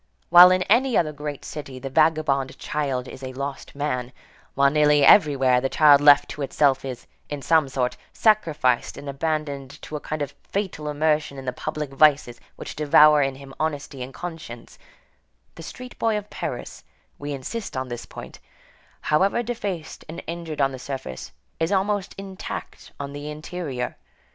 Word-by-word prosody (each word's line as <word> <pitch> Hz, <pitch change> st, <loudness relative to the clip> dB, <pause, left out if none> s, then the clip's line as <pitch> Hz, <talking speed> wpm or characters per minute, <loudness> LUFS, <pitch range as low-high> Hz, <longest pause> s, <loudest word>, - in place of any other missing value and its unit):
While 175 Hz, +1 st, +10 dB
in 185 Hz, 0 st, +2 dB
any 240 Hz, +5 st, +3 dB
other 155 Hz, -3 st, +1 dB
great 145 Hz, -1 st, -6 dB
city 140 Hz, -4 st, -7 dB
the 135 Hz, +1 st, -7 dB
vagabond 155 Hz, -3 st, +2 dB
child 135 Hz, -4 st, -2 dB
is 130 Hz, -, -10 dB
a 130 Hz, -1 st, -6 dB
lost 140 Hz, +1 st, -6 dB
man, 125 Hz, -4 st, -2 dB, 0.4 s
while 140 Hz, 0 st, +4 dB
nearly 150 Hz, -1 st, +4 dB
everywhere 135 Hz, -8 st, +5 dB
the 135 Hz, -, -1 dB
child 145 Hz, -1 st, +6 dB
left 145 Hz, -1 st, +7 dB
to 150 Hz, -, -7 dB
itself 140 Hz, 0 st, +2 dB
is, 130 Hz, -3 st, -6 dB, 0.2 s
in 145 Hz, -2 st, -5 dB
some 160 Hz, -4 st, +3 dB
sort, 125 Hz, -2 st, -1 dB
sacrificed 155 Hz, -, +1 dB
and 145 Hz, -, -9 dB
abandoned 140 Hz, -1 st, -3 dB
to 155 Hz, -, -7 dB
a -, -, -3 dB
kind 150 Hz, 0 st, -4 dB
of 140 Hz, 0 st, -6 dB
fatal 190 Hz, -7 st, -4 dB
immersion 150 Hz, -1 st, 0 dB
in 135 Hz, -, -8 dB
the 125 Hz, -, -2 dB
public 150 Hz, +2 st, -5 dB
vices 140 Hz, -4 st, +3 dB
which -, -, -8 dB
devour 150 Hz, 0 st, +6 dB
in 135 Hz, -1 st, 0 dB
him 135 Hz, 0 st, -12 dB
honesty 145 Hz, -3 st, -3 dB
and 125 Hz, +1 st, -6 dB
conscience, 160 Hz, -9 st, -8 dB, 0.7 s
the -, -, -11 dB
street 250 Hz, +9 st, -10 dB
boy 225 Hz, -2 st, +1 dB
of 210 Hz, 0 st, -7 dB
Paris, -, -, -6 dB, 0.4 s
we 145 Hz, 0 st, -5 dB
insist 140 Hz, -, -5 dB
on 130 Hz, 0 st, -2 dB
this 120 Hz, -1 st, -6 dB
point, -, -, -10 dB, 0.6 s
however 195 Hz, +9 st, +2 dB
defaced 205 Hz, -9 st, -5 dB
and 165 Hz, -, -7 dB
injured 165 Hz, -3 st, -5 dB
on 135 Hz, 0 st, +3 dB
the 130 Hz, -, -8 dB
surface, 125 Hz, -, -6 dB, 0.3 s
is 165 Hz, +2 st, 0 dB
almost 200 Hz, 0 st, 0 dB
intact 195 Hz, -1 st, -8 dB
on 140 Hz, 0 st, -5 dB
the 145 Hz, +1 st, -6 dB
interior. 150 Hz, -4 st, -5 dB
150 Hz, 170 wpm, -24 LUFS, 135-165 Hz, 0.7 s, While